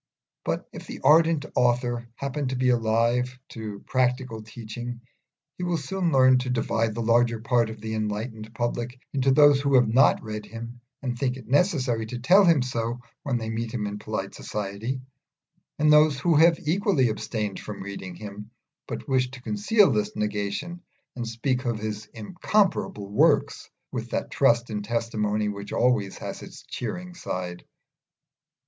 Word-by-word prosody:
But -, -, -2 dB
if -, -, -9 dB
the -, -, -7 dB
ardent 160 Hz, +1 st, +5 dB
author 120 Hz, -1 st, +1 dB
happen 140 Hz, +1 st, -3 dB
to 130 Hz, -, -2 dB
be 130 Hz, 0 st, +2 dB
alive 120 Hz, +2 st, +1 dB
to 105 Hz, -3 st, -7 dB
practical 125 Hz, -3 st, 0 dB
teaching 120 Hz, +2 st, -7 dB, 0.6 s
he -, -, -3 dB
will 175 Hz, -1 st, 0 dB
soon 175 Hz, +4 st, -1 dB
learn 130 Hz, -2 st, +6 dB
to 125 Hz, 0 st, -3 dB
divide 115 Hz, -2 st, 0 dB
the 115 Hz, -, -2 dB
larger 115 Hz, 0 st, +3 dB
part 120 Hz, 0 st, +2 dB
of 110 Hz, -1 st, -8 dB
the 110 Hz, +1 st, -5 dB
enlightened 110 Hz, +1 st, -3 dB
public 120 Hz, +1 st, -2 dB
into 135 Hz, -1 st, +2 dB
those 145 Hz, 0 st, +6 dB
who 140 Hz, -1 st, +2 dB
have 125 Hz, -2 st, +5 dB
not 130 Hz, +6 st, +4 dB
read 105 Hz, -1 st, -6 dB
him 115 Hz, +1 st, -8 dB, 0.2 s
and 125 Hz, -2 st, -2 dB
think 125 Hz, +1 st, -1 dB
it 130 Hz, -, -12 dB
necessary 130 Hz, -, +1 dB
to 125 Hz, -, -5 dB
tell 185 Hz, -, +5 dB
him 165 Hz, -7 st, +5 dB
so 120 Hz, -1 st, -2 dB, 0.2 s
when 130 Hz, -4 st, -1 dB
they 110 Hz, -1 st, -4 dB
meet 115 Hz, 0 st, -3 dB
him 110 Hz, -4 st, -2 dB
in 105 Hz, 0 st, -4 dB
polite 105 Hz, -2 st, -4 dB
society, 105 Hz, +5 st, -4 dB, 0.8 s
and 150 Hz, 0 st, +5 dB
those 150 Hz, -2 st, +5 dB
who 170 Hz, +2 st, +2 dB
have 165 Hz, +2 st, +6 dB
equally 165 Hz, -, +2 dB
abstained 110 Hz, -1 st, -3 dB
from 105 Hz, -2 st, -7 dB
reading 95 Hz, -2 st, -7 dB
him, 105 Hz, +2 st, -9 dB, 0.4 s
but -, -, -6 dB
wish 130 Hz, -2 st, +2 dB
to 130 Hz, -1 st, -11 dB
conceal 210 Hz, -2 st, +3 dB
this 105 Hz, -2 st, -1 dB
negation 105 Hz, -, -3 dB, 0.3 s
and 120 Hz, -2 st, -4 dB
speak 125 Hz, +3 st, -1 dB
of 120 Hz, -2 st, 0 dB
his 105 Hz, 0 st, -5 dB
"incomparable 175 Hz, -, 0 dB
works" 100 Hz, +1 st, +2 dB, 0.2 s
with -, -, -4 dB
that -, -, -3 dB
trust 120 Hz, 0 st, +3 dB
in 105 Hz, -1 st, -2 dB
testimony 105 Hz, -1 st, -1 dB
which 100 Hz, -1 st, -5 dB
always 115 Hz, -6 st, +1 dB
has -, -, -6 dB
its -, -, -11 dB
cheering 180 Hz, +10 st, -5 dB
side. 90 Hz, -, -5 dB
120 Hz, 165 wpm, -26 LUFS, 110-135 Hz, 0.8 s, learn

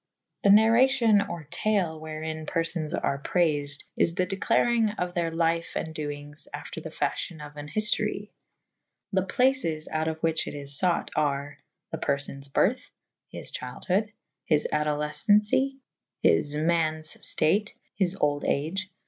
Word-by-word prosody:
The 200 Hz, -, +3 dB
Narracion 225 Hz, -1 st, +5 dB
or 170 Hz, -5 st, -6 dB
tale 180 Hz, -5 st, 0 dB
wherin 155 Hz, 0 st, -5 dB
perfones 165 Hz, -2 st, -1 dB
are 140 Hz, -, 0 dB
prayfed 145 Hz, -4 st, 0 dB
/ -, -, -54 dB
is 165 Hz, -, +2 dB
the 185 Hz, -1 st, +1 dB
declarynge 215 Hz, +3 st, +1 dB
of 180 Hz, 0 st, -2 dB
theyr 170 Hz, -1 st, 0 dB
lyfe 165 Hz, 0 st, 0 dB
and 160 Hz, -, -3 dB
doynges 145 Hz, -1 st, -6 dB
after -, -, -7 dB
the -, -, -7 dB
fafl'hyon 160 Hz, -3 st, -3 dB
of 145 Hz, 0 st, -12 dB
an 145 Hz, 0 st, -8 dB
hyftorye. 215 Hz, +6 st, -1 dB, 0.8 s
The 190 Hz, -, +3 dB
places 195 Hz, -7 st, +1 dB
out 155 Hz, 0 st, -1 dB
of 160 Hz, -, -1 dB
the 160 Hz, -, -25 dB
whiche 165 Hz, -1 st, 0 dB
it -, -, -5 dB
is 140 Hz, -1 st, +3 dB
fought 180 Hz, -2 st, +1 dB
are: 145 Hz, -1 st, -1 dB, 0.3 s
The -, -, -4 dB
perfones 140 Hz, 0 st, -2 dB
byrthe. 230 Hz, -, +2 dB, 0.5 s
His -, -, -7 dB
chyldhode. 205 Hz, +3 st, -2 dB, 0.3 s
His 150 Hz, -2 st, +2 dB
adolefcencie. 150 Hz, -, +2 dB, 0.5 s
His 145 Hz, -, +3 dB
ma«nes 155 Hz, 0 st, 0 dB
ftate. 200 Hz, +7 st, +2 dB, 0.2 s
His 190 Hz, -1 st, 0 dB
olde 145 Hz, -1 st, +1 dB
age. 185 Hz, +7 st, -1 dB
165 Hz, 145 wpm, -27 LUFS, 150-195 Hz, 0.8 s, Narracion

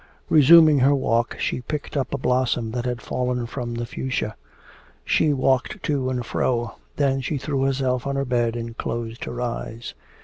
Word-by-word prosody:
Resuming 155 Hz, 0 st, +7 dB
her 140 Hz, +3 st, +4 dB
walk, 120 Hz, -3 st, 0 dB
she -, -, -1 dB
picked 150 Hz, +4 st, -5 dB
up 135 Hz, -2 st, -1 dB
a -, -, -1 dB
blossom 125 Hz, -3 st, 0 dB
that 120 Hz, +1 st, -3 dB
had 125 Hz, -1 st, -3 dB
fallen 125 Hz, -1 st, -2 dB
from 120 Hz, -1 st, -5 dB
the 120 Hz, 0 st, -3 dB
fuchsia. 115 Hz, -3 st, -3 dB, 0.7 s
She 155 Hz, -, +3 dB
walked 135 Hz, +8 st, 0 dB
to 140 Hz, -5 st, 0 dB
and 125 Hz, -2 st, -2 dB
fro. 120 Hz, -1 st, -1 dB, 0.2 s
Then 135 Hz, -2 st, +1 dB
she 145 Hz, +3 st, -2 dB
threw 140 Hz, 0 st, -2 dB
herself 135 Hz, -1 st, 0 dB
on 140 Hz, -, -1 dB
her 140 Hz, 0 st, 0 dB
bed 120 Hz, -2 st, 0 dB
and 115 Hz, -1 st, -5 dB
closed 115 Hz, -1 st, -4 dB
her 120 Hz, -, -6 dB
eyes.... 120 Hz, -1 st, -4 dB
125 Hz, 175 wpm, -23 LUFS, 120-140 Hz, 0.7 s, Resuming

